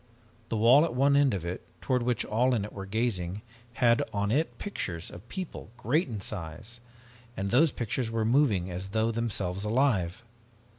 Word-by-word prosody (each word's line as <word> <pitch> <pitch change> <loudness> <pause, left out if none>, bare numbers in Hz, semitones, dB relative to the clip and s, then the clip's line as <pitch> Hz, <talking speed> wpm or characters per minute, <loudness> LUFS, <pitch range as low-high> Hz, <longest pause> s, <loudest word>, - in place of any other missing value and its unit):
The 115 - -1
wall 120 +7 +7
at 165 -7 -1
one 140 +2 +4
end 140 -2 +5
of 90 -3 -5
it, 85 +1 -4 0.2
toward 125 -2 0
which 120 -1 0
all 125 +4 +2
in 105 -3 -1
it 105 - -10
were 95 -1 -7
gazing, 100 -3 -1 0.3
had 115 0 +3
on 100 0 -1
it 155 +7 0
pictures 90 - -4
of 100 +7 -12
people, 185 - -6
great 145 - +1
in 110 -5 -5
size, 95 +5 -5 0.6
and 100 +1 -2
those 145 +5 +5
pictures 120 0 -2
were 115 -1 -1
moving 110 -8 +2
as 90 +2 -3
though 110 +2 +1
themselves 100 -5 -1
alive! 110 -5 +1
115 Hz, 180 wpm, -29 LUFS, 95-125 Hz, 0.6 s, wall